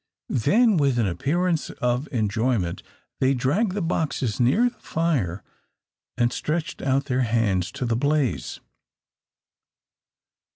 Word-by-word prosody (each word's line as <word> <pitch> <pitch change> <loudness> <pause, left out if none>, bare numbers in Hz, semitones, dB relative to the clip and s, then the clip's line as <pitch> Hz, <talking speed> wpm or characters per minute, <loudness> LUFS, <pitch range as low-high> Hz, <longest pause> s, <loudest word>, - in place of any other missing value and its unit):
Then, 215 - +3
with 140 -4 +2
an 115 - +2
appearance 155 - 0
of 125 +3 -1
enjoyment, 110 -4 0 0.4
they 135 +1 +3
dragged 170 - +1
the 200 -2 -2
boxes 140 - -1
near 135 - +4
the - - -28
fire, 135 - -1 0.7
and 120 0 +2
stretched 155 +1 -3
out 135 +1 +1
their 130 -2 0
hands 105 -6 +1
to 125 - -3
the 115 -1 0
blaze. 135 - 0
130 Hz, 120 wpm, -24 LUFS, 115-155 Hz, 0.7 s, near